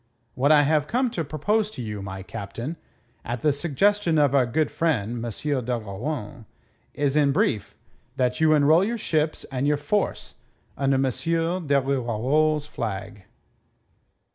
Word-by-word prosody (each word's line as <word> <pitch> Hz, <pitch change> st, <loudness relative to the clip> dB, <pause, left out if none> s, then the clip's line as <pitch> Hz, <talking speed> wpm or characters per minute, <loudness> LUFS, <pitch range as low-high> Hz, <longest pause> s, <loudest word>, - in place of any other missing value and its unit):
What 140 Hz, +3 st, +2 dB
I 150 Hz, -1 st, +6 dB
have 150 Hz, 0 st, +2 dB
come 245 Hz, +4 st, 0 dB
to 165 Hz, -, -2 dB
propose 205 Hz, +9 st, 0 dB
to 170 Hz, -, -8 dB
you, 105 Hz, -2 st, -5 dB
my 95 Hz, -1 st, -6 dB
Captain, 115 Hz, -, -6 dB, 0.5 s
at 120 Hz, 0 st, -5 dB
the 150 Hz, -, +4 dB
suggestion 170 Hz, +4 st, +1 dB
of 145 Hz, -3 st, +3 dB
our 130 Hz, -3 st, +4 dB
good 155 Hz, +6 st, 0 dB
friend 120 Hz, -8 st, -1 dB
M. 120 Hz, -, -3 dB
d'Ogeron, 120 Hz, -1 st, -3 dB, 0.5 s
is, 145 Hz, -1 st, 0 dB
in 145 Hz, -2 st, +4 dB
brief, 110 Hz, -5 st, 0 dB, 0.4 s
that 125 Hz, +4 st, 0 dB
you 155 Hz, -1 st, +5 dB
enroll 155 Hz, +4 st, +5 dB
your 235 Hz, +4 st, -1 dB
ships 155 Hz, -6 st, -1 dB
and 135 Hz, +1 st, -1 dB
your 150 Hz, 0 st, +2 dB
force 170 Hz, +8 st, -2 dB, 0.4 s
under 135 Hz, 0 st, +1 dB
M. 135 Hz, -, +2 dB
de 165 Hz, +2 st, 0 dB
Rivarol's 135 Hz, +4 st, +1 dB
flag." 105 Hz, -6 st, -5 dB
140 Hz, 145 wpm, -25 LUFS, 120-155 Hz, 0.5 s, I